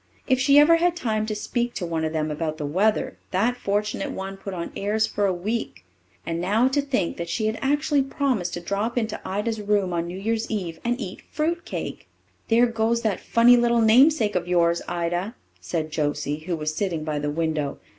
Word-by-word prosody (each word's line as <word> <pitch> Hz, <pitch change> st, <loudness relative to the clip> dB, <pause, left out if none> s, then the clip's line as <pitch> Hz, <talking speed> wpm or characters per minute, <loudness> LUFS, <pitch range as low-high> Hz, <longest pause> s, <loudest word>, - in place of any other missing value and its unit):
If 260 Hz, -1 st, +2 dB
she 280 Hz, +2 st, +5 dB
ever 315 Hz, +3 st, +7 dB
had 350 Hz, +1 st, +2 dB
time 215 Hz, -8 st, -1 dB
to 215 Hz, -, -2 dB
speak 240 Hz, +3 st, -2 dB
to 185 Hz, -, -3 dB
one 165 Hz, -1 st, -2 dB
of 160 Hz, -, -1 dB
them 155 Hz, -1 st, -1 dB
about 155 Hz, 0 st, -3 dB
the 150 Hz, -, -4 dB
weather, 195 Hz, +9 st, 0 dB
that 220 Hz, +7 st, +1 dB
fortunate 210 Hz, -2 st, -2 dB
one 195 Hz, 0 st, -5 dB
put 195 Hz, +1 st, -7 dB
on 170 Hz, -2 st, -5 dB
airs 215 Hz, +2 st, +1 dB
for 205 Hz, -2 st, 0 dB
a -, -, +2 dB
week. 200 Hz, -, -3 dB, 0.4 s
And 165 Hz, 0 st, -2 dB
now 210 Hz, +7 st, +3 dB
to 285 Hz, +2 st, +1 dB
think 275 Hz, -11 st, -1 dB
that 170 Hz, 0 st, -5 dB
she 215 Hz, -, -1 dB
had 220 Hz, +1 st, -1 dB
actually 290 Hz, +1 st, +2 dB
promised 265 Hz, -9 st, -1 dB
to 175 Hz, -, -5 dB
drop 200 Hz, +7 st, -2 dB
into 220 Hz, -2 st, -1 dB
Ida's 210 Hz, +3 st, -2 dB
room 200 Hz, -3 st, +1 dB
on 170 Hz, 0 st, -1 dB
New 175 Hz, +2 st, -6 dB
Year's 225 Hz, +3 st, -2 dB
Eve 180 Hz, -7 st, -3 dB
and 240 Hz, +2 st, 0 dB
eat 190 Hz, -6 st, -6 dB
fruit 335 Hz, +3 st, -1 dB
cake! -, -, -5 dB, 0.4 s
"There 235 Hz, +2 st, +5 dB
goes 230 Hz, 0 st, 0 dB
that 215 Hz, -4 st, 0 dB
funny 235 Hz, +1 st, +5 dB
little 235 Hz, -1 st, +3 dB
namesake 230 Hz, 0 st, +5 dB
of 175 Hz, -1 st, -1 dB
yours, 170 Hz, -1 st, +2 dB
Ida," 175 Hz, +5 st, -2 dB, 0.2 s
said 155 Hz, -2 st, -3 dB
Josie, 150 Hz, -1 st, -1 dB
who 175 Hz, -, 0 dB
was 155 Hz, -1 st, -3 dB
sitting 170 Hz, -3 st, -2 dB
by 155 Hz, -1 st, -2 dB
the 145 Hz, 0 st, -2 dB
window. 155 Hz, -2 st, -1 dB
205 Hz, 205 wpm, -24 LUFS, 170-235 Hz, 0.4 s, ever